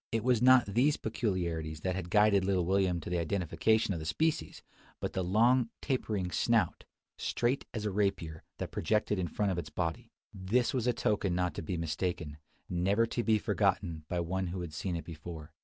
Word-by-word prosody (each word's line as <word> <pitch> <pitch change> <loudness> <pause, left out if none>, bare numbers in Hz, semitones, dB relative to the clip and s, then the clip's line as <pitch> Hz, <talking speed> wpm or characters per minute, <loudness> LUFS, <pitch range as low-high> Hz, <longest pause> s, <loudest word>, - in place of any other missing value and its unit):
It 115 -1 0
was 125 -2 +3
not 130 -1 +7
these 125 +9 +2
peculiarities 85 -8 -2
that 95 +2 -1
had 95 -2 -4
guided 105 -1 +4
little 95 -2 +1
William 95 -1 +2
to 80 - -7
the 90 - +1
identification 95 +5 +1
of 85 - -3
the 80 - -6
species; 160 - -1 0.4
but - - -3
the 95 - -1
long, 115 +6 +3
tapering 105 -9 -1
snout, 115 -2 +1 0.3
straight 125 +3 0
as 110 -2 -4
a 105 - 0
rapier, 95 -6 -1 0.2
that - - -5
projected 105 +2 0
in 90 - -1
front 100 +5 0
of 90 - -1
its 80 -2 -6
body. 80 +1 -3 0.2
This 105 +8 0
was 125 -2 0
a - - +5
token 100 -5 0
not 90 0 0
to - - -5
be 90 +3 -3
mistaken, 80 -2 -3 0.3
never 95 +6 +2
to 120 +1 -2
be 110 -1 +3
forgotten 95 -6 0
by 90 -1 0
one 95 +2 -2
who 90 +1 -4
had 85 -3 -6
seen 90 +2 -3
it 85 - -5
before. 80 -1 -8
95 Hz, 195 wpm, -31 LUFS, 85-110 Hz, 0.4 s, not